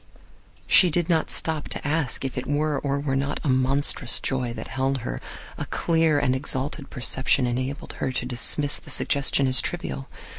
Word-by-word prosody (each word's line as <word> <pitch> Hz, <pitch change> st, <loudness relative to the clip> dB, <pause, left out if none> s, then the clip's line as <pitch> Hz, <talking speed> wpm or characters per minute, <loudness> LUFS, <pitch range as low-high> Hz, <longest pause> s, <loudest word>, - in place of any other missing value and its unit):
She 180 Hz, -, +7 dB
did 175 Hz, +2 st, 0 dB
not 160 Hz, -2 st, +1 dB
stop 160 Hz, -2 st, 0 dB
to -, -, -2 dB
ask 145 Hz, -4 st, 0 dB
if 130 Hz, -, -4 dB
it 125 Hz, -, -4 dB
were 145 Hz, 0 st, 0 dB
or 140 Hz, 0 st, -2 dB
were 140 Hz, -2 st, -2 dB
not 140 Hz, +1 st, -2 dB
a 145 Hz, -, -1 dB
monstrous 130 Hz, 0 st, +1 dB
joy 125 Hz, -3 st, -2 dB
that -, -, -7 dB
held 135 Hz, 0 st, -1 dB
her. -, -, -4 dB, 0.4 s
A -, -, -4 dB
clear 165 Hz, -2 st, +1 dB
and 130 Hz, -2 st, +1 dB
exalted 135 Hz, +2 st, -3 dB
perception 130 Hz, +2 st, +1 dB
enabled 130 Hz, +6 st, -4 dB
her 130 Hz, -, -1 dB
to 125 Hz, -, -3 dB
dismiss 130 Hz, +4 st, +1 dB
the -, -, -14 dB
suggestion 140 Hz, -1 st, +2 dB
as 130 Hz, -2 st, +6 dB
trivial. 65 Hz, 0 st, -4 dB
135 Hz, 180 wpm, -24 LUFS, 130-150 Hz, 0.4 s, She